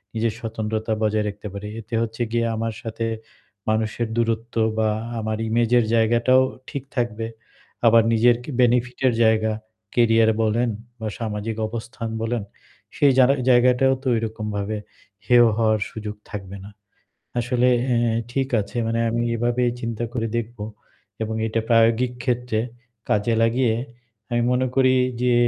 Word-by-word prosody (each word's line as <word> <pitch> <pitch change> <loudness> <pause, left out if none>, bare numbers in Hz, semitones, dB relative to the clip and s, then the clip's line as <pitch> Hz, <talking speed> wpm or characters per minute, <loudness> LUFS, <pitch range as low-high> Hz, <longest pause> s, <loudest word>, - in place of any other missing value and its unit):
নিজের 110 0 0
স্বতন্ত্রতা 110 -1 -2
বজায় 105 0 +1
রাখতে 105 +1 -8
পারি। 100 +1 -6
এতে 115 +2 -15
হচ্ছে 115 +1 -4
গিয়ে 115 0 +1
আমার 115 0 -2
সাথে 115 0 -3 0.6
মানুষের 110 +1 0
দূরত্ব 115 0 -1 0.2
বা 110 -1 +2 0.3
আমার 110 0 -2
image 115 +1 +1
এর 115 - +1
জায়গাটাও 120 +3 +4 0.3
ঠিক 140 - -5
থাকবে। 115 -2 -1 0.6
আবার 115 0 +6
নিজের 120 +2 +5
কি - - -9
benefit 125 0 +2
এর 125 - +3
জায়গা, 110 -1 +3 0.4
career 115 -2 +4
বলেন 115 +3 +1 0.3
বা 110 - -4
সামাজিক 110 -1 -3
অবস্থান 115 +1 -6
বলেন 115 -1 -1 0.5
সেই 140 -1 +5
জানা 130 +1 +6 0.2
জায়গাটাও 125 +1 +5
তো - - -4
ওইরকমভাবে 110 -2 -3 0.5
হেয় 120 0 +6
হওয়ার 110 -1 +2
সুযোগ 105 -1 -6
থাকবে 100 -2 -7
না। - - -9 0.7
আসলে 125 +1 +2 0.3
এ - - +2 0.4
ঠিক 135 0 0
আছে 100 +3 -7
মানে 115 +1 0
আমি 120 +1 0
এভাবেই 120 +1 +1
চিন্তা 115 -1 -3
করে 115 -2 -1
দেখবো 115 -2 -4 0.6
এবং 110 0 -2
এটা 115 +1 0
প্রায়োগিক 115 +1 +4
ক্ষেত্রে 125 -3 0 0.5
কাজে 105 +3 +2
লাগিয়ে 115 0 +2 0.6
আমি 120 0 +1
মনে 130 +1 +2
করি 130 -1 +5 0.3
যে 125 -1 +3
115 Hz, 145 wpm, -23 LUFS, 110-120 Hz, 0.7 s, আবার